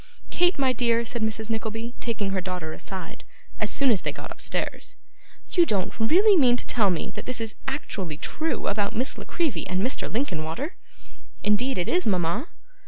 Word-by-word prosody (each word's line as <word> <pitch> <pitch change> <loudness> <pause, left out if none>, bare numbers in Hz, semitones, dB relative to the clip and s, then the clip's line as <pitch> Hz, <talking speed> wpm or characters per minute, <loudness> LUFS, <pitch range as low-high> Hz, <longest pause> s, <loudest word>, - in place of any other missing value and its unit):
'Kate, 355 +1 +3
my 265 -2 +3
dear,' 235 -1 +2
said 235 0 -3
Mrs. 220 0 0
Nickleby, 225 +1 -3
taking 215 -4 -1
her 190 -1 0
daughter 180 -4 -4
aside, 190 -2 -7 0.4
as - - 0
soon 275 -2 +3
as 205 - +2
they - - -1
got - - -8
upstairs, - - -2 0.6
'you 350 - +6
don't 195 - 0
really 370 - +6
mean 250 -7 +5
to - - -3
tell 215 -5 +3
me 175 -3 -1
that - - -7
this 255 -1 -1
is 225 -1 -2
actually 195 - -3
true 320 - -2
about 205 0 0
Miss 250 +4 -1
La - - -7
Creevy 325 - -1
and 185 +1 0
Mr. 255 +3 0
Linkinwater?' 215 - -2 0.7
'Indeed 210 +5 +2
it 180 - 0
is, 360 +1 +2
mama. 185 - +1
225 Hz, 180 wpm, -26 LUFS, 195-265 Hz, 0.7 s, you